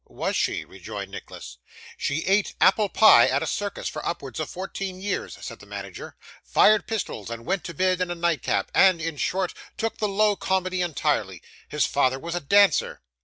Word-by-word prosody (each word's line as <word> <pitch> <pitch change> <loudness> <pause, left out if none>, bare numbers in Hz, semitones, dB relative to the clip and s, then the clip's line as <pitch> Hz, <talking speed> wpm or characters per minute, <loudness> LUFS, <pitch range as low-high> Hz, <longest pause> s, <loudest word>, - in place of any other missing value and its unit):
'Was - - -3
she?' - - -1
rejoined - - -8
Nicholas. - - -10 0.4
'She 150 +3 -2
ate 195 +2 +1
apple 205 +1 +4
pie 155 - +7
at 135 +2 +1
a - - -2
circus 205 -1 -3
for - - -5
upwards 140 -7 -4
of 155 - -3
fourteen 190 0 -5
years,' 200 +2 -3
said - - -8
the - - -15
manager; - - -8 0.3
'fired 215 0 +4
pistols, 195 - -4
and 115 0 -7
went 195 0 -1
to 170 - -6
bed 185 +2 +1
in 180 - -1
a 175 - -3
nightcap; 170 -5 0
and, 185 -3 +5
in 165 -1 -3
short, 185 +5 -1 0.2
took 225 0 -3
the 210 - 0
low 210 +1 +2
comedy 185 -1 -1
entirely. 165 -7 -1 0.3
His 150 - +1
father 130 -2 +1
was 170 +5 -6
a 175 - -1
dancer. 200 +7 +3
185 Hz, 185 wpm, -25 LUFS, 155-195 Hz, 0.4 s, pie